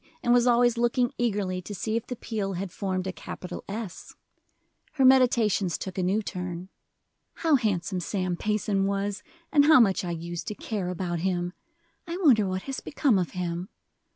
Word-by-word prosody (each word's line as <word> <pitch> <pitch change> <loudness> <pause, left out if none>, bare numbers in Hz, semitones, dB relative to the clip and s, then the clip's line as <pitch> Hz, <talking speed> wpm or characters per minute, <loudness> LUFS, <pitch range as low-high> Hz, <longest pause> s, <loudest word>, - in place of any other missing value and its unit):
and 240 - +4
was 245 0 +4
always 240 -1 +4
looking 240 +1 +2
eagerly 200 -6 0
to 205 +3 -7
see 220 +4 -2
if 230 - -2
the 250 - -4
peel 210 -4 -3
had 185 0 -4
formed 185 -1 -2
a 190 - -2
capital 180 -1 -7
S. 205 -3 -6 0.8
Her 275 -4 +3
meditations 235 -8 +4
took 190 -2 -6
a 190 - -1
new 195 +4 +1
turn. 180 -2 -5 0.7
"How 325 -2 +1
handsome 200 -7 +1
Sam 185 0 -2
Payson 205 0 0
was, 200 0 -2 0.3
and 290 -2 +5
how 315 -2 +8
much 200 -4 +3
I 180 - -3
use 170 0 -4
to 210 - -4
care 200 -5 -3
about 175 -1 -2
him! 175 0 -1 0.5
I 340 +1 -3
wonder 250 - +4
what 185 0 -3
has 270 -1 -4
become 275 -8 +1
of 180 - -2
him! 175 +1 -3
200 Hz, 180 wpm, -27 LUFS, 180-235 Hz, 0.8 s, how